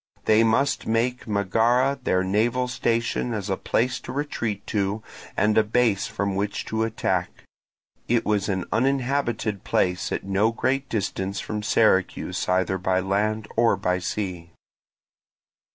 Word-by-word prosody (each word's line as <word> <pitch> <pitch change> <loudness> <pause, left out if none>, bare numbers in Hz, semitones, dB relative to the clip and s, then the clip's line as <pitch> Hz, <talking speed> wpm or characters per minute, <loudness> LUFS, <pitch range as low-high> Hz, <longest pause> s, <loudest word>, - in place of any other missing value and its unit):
They 110 +1 +5
must 115 +5 +1
make 120 +3 0
Megara 115 +7 +2
their 95 -4 +2
naval 115 +6 +1
station 115 -1 -1
as 100 -2 -3
a - - +2
place 125 +6 0
to - - -8
retreat 120 -8 -3
to 105 0 -1 0.3
and 105 0 +3
a - - +4
base 110 -2 +1
from 100 0 -2
which 100 +1 -2
to 110 0 -2
attack: 115 0 -1 0.6
it 115 -1 +1
was 105 -1 +1
an 95 -2 -1
uninhabited 125 -5 0
place 90 -1 0
at - - -2
no 100 +3 +2
great 135 +3 -1
distance 100 -2 -2
from 105 -1 -4
Syracuse 105 -5 +1
either 95 +1 +1
by 95 0 +1
land 105 +3 0
or 115 -2 +4
by 90 -1 0
sea. 90 -3 -4
110 Hz, 140 wpm, -24 LUFS, 95-120 Hz, 0.6 s, They